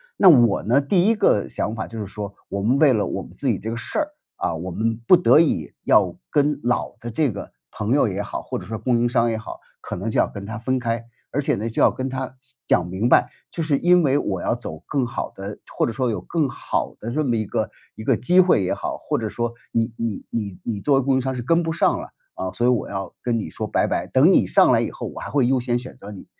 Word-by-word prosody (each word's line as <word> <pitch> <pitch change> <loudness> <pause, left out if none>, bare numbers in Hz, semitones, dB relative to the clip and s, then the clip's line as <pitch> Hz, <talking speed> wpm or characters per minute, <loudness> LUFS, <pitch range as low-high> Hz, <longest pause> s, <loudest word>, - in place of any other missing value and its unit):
那 190 - +7
我 120 - +5
呢， 125 +6 +3
第 175 +6 +2
一 225 - +5
个 105 - +2
想 110 - -2
法 110 - -3
就 115 -1 -8
是 105 - -3
说， 100 +1 -6
我 100 0 -3
们 125 +6 +2
为 140 -3 +5
了 105 -3 +1
我 - - -3
们 - - -11
自 - - -1
己 - - 0
这 110 - -5
个 115 - -3
事 120 - -2
儿， 305 - 0 0.3
啊， 85 - -1
我 90 +3 -5
们 115 +4 -1
不 180 - +7
得 175 - +5
已 110 - 0
要 - - +3
跟 145 0 +1
老 120 0 -1
的 120 0 -5
这 145 +3 +1
个 100 - -8 0.2
朋 105 +1 -3
友 140 -3 +4
也 100 +1 -2
好， 100 - -4
或 - - -4
者 90 - -8
说 110 +3 -4
供 120 +2 +1
应 120 +1 +2
商 120 -1 +2
也 110 - -1
好， 110 - -8 0.2
可 - - -5
能 100 +5 -3
就 - - -2
要 - - +3
跟 100 -1 -8
他 115 +3 -5
分 130 +2 -1
开。 115 -1 -2 0.3
而 145 - -1
且 140 - +1
呢， 110 +3 -3
就 115 - -1
要 - - +6
跟 130 +1 -4
他 130 0 -5
细 135 0 -15
讲 90 0 +2
明 95 +6 -1
白， - - +5 0.2
就 170 - -4
是 150 -3 +1
因 180 0 +5
为 140 -2 +3
我 95 -8 -2
要 - - 0
走 80 -9 -8
更 135 -4 0
好 120 - -4
的 100 +1 -7 0.2
或 - - +2
者 - - -2
说 125 +1 -1
有 100 -5 -2
更 150 - -1
好 - - -3
的 115 - -5
这 155 +3 0
么 120 -4 +1
一 110 -1 -1
个 - - -2 0.3
一 110 - -8
个 - - +3
机 180 +10 +3
会 180 - +5
也 90 - 0
好， - - -4
或 - - -2
者 110 - -2
说 120 +2 -3 0.2
你 115 +1 0
你 115 -3 -3
你 100 -5 -3
你 110 -4 -3
作 140 +3 +2
为 135 - +3
供 135 0 +2
应 130 - +2
商 130 0 -2
是 125 - -3
跟 165 +5 +3
不 165 -1 -2
上 - - +2
了， - - -10 0.2
啊， 95 - -4
所 120 - 0
以 - - +5
我 125 -3 0
要 95 -2 -5
跟 120 -2 0
你 110 - -4
说 - - -4
拜 - - +1
拜， - - -1
等 - - +5
你 - - +4
上 - - +5
来 - - +4
以 - - -1
后， - - -7
我 - - -9
还 - - -6
会 140 -4 +2
优 130 0 +2
先 120 0 0
选 125 +1 -9
择 105 - -10
你。 100 - -10
120 Hz, 305 characters per minute, -22 LUFS, 105-135 Hz, 0.3 s, 那